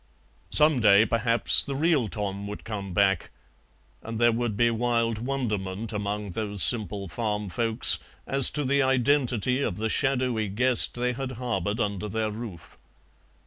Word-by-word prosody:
Some 150 -3 +4
day 105 -1 +5
perhaps 115 +1 +4
the 140 - -5
real 150 -5 +1
Tom 100 -1 -5
would 105 - -8
come 100 -4 -6
back, 95 -1 0 0.7
and 115 0 -7
there 120 +1 +3
would 115 -2 -3
be 120 +1 +2
wild 115 -1 -1
wonderment 110 -5 -4
among 105 -1 -4
those 105 0 0
simple 105 -4 +1
farm 105 +2 -4
folks 115 +2 +2 0.3
as 135 -1 +7
to 150 - -3
the 140 +2 +1
identity 130 -2 +1
of 90 -9 -3
the 110 +1 -2
shadowy 125 -4 -1
guest 120 +5 +1
they 125 +1 -2
had 130 +1 -6
harboured 110 -4 -3
under 105 -2 -3
their 110 0 -2
roof. 105 -7 -9
115 Hz, 150 wpm, -25 LUFS, 105-125 Hz, 0.7 s, as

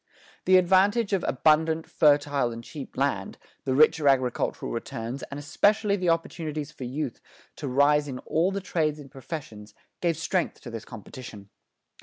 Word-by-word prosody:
The 185 0 +6
advantage 195 +4 +3
of 190 - +1
abundant, 160 +3 +2
fertile, 145 -4 +3
and 115 0 -7
cheap 140 +2 -9
land, 130 -8 -1 0.3
the 130 - 0
richer 150 +1 +4
agricultural 130 -3 +1
returns, 115 +2 -5
and 140 - -6
especially 205 +8 +2
the 180 -3 0
opportunities 155 -3 -2
for 140 -4 -8
youth 135 0 -4 0.4
to 145 - -5
rise 145 +3 +3
in 130 -2 -5
all 165 +7 0
the 200 0 -3
trades 155 -5 0
and 140 -3 -12
professions, 115 -7 -8 0.3
gave 170 -3 +1
strength 175 +2 -1
to - - -9
this 115 -1 -7
competition. 110 -3 -10
150 Hz, 155 wpm, -26 LUFS, 130-165 Hz, 0.4 s, The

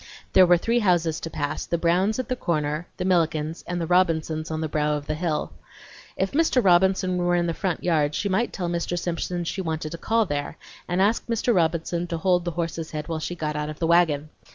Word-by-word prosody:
There 185 -1 +7
were 175 0 +6
three 230 +7 +1
houses 175 -6 +2
to 165 - -5
pass; 155 -1 -3
the 170 - 0
Browns' 180 +5 +2
at 255 - -3
the 255 - -1
corner, 155 -4 -2
the 180 - -2
Millikens', 165 -3 0
and 180 0 -2
the 170 - -1
Robinsons' 160 -3 +1
on 160 0 -3
the 160 - -1
brow 150 0 0
of 145 - -8
the 155 - -2
hill. 155 -1 -2 0.6
If 190 0 0
Mr. 285 -5 +2
Robinson 185 0 +3
were 175 0 +1
in 175 0 +1
the 170 - -1
front 185 -1 -2
yard 155 -4 +1
she 205 - -1
might 205 +5 0
tell 180 -3 -3
Mr. 170 +1 -2
Simpson 175 0 -2
she 190 +3 -3
wanted 160 -3 -3
to 170 - -6
call 225 +4 +2
there 145 -4 -3 0.3
and 180 +2 +1
ask 215 +3 +1
Mr. 235 +1 +1
Robinson 170 0 0
to 170 -1 -3
hold 180 +1 +2
the - - 0
horse's 165 -1 -3
head 150 0 -5
while 160 -1 -2
she 175 +3 -4
got 155 -2 -3
out 150 0 -2
of 155 - -7
the 165 - -1
wagon. 160 -3 +3
170 Hz, 230 wpm, -24 LUFS, 155-185 Hz, 0.6 s, There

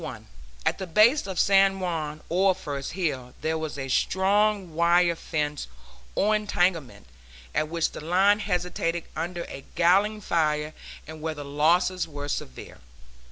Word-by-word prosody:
At - - +1
the 190 - -5
base 215 - +4
of 190 -2 -3
San 195 0 +4
Juan, 155 -4 -3
or 185 +2 +3
first 145 -6 -5
hill, 140 -9 -3
there 160 +1 0
was 160 -2 -4
a 135 -1 -4
strong 195 +4 +1
wire 170 +1 +3
fence, 150 - -3 0.5
or 215 +2 +3
entanglement, 175 - -1 0.5
at 155 - 0
which 165 0 0
the - - -8
line 195 +5 +3
hesitated 180 -4 -2
under 170 +2 -3
a 135 - -9
galling 200 +5 +3
fire, 155 -5 0 0.3
and 155 0 -10
where 160 0 -3
the 145 -1 -7
losses 165 +5 +2
were 145 -2 -6
severe. 65 - -6
170 Hz, 145 wpm, -26 LUFS, 155-190 Hz, 0.5 s, base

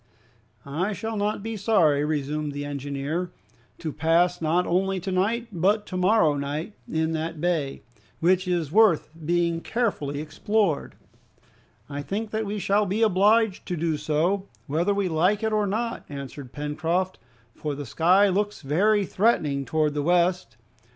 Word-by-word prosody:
"I 170 +9 -2
shall 220 +4 -4
not 205 0 -1
be 225 0 -4
sorry," 185 -9 +3
resumed 150 0 -2
the 145 0 -4
engineer, 145 +4 -3 0.5
"to 155 -3 -5
pass 170 +3 +2
not 170 +3 +2
only 190 +2 +1
to 190 +2 -4
night 225 +6 0
but 200 +4 +1
to 185 - -7
morrow 185 -3 +4
in 160 +3 -3
that 160 0 -3
bay, 160 -5 -1 0.4
which 185 +2 +2
is 170 -5 -1
worth 205 -7 +4
being 170 +1 +1
carefully 170 - -1
explored." 160 +3 -1 0.9
"I 145 0 -5
think 205 +9 -4
that 220 -1 -2
we 210 +1 -3
shall 205 +2 +1
be 210 +5 +1
obliged 210 +1 +3
to 180 - -2
do 160 0 0
so, 160 +7 0 0.2
whether 165 +7 0
we 200 -1 0
like 180 +6 +1
it 220 0 0
or 210 -1 +2
not," 230 +4 -2
answered 140 -2 -8
Pencroft, 160 +6 -2 0.3
"for 150 -2 -4
the 145 0 -6
sky 180 - +4
looks 205 0 -1
very 200 +9 +2
threatening 155 -11 +1
towards 155 +2 +1
the 145 - -1
west. 175 -6 +1
175 Hz, 150 wpm, -25 LUFS, 150-205 Hz, 0.9 s, morrow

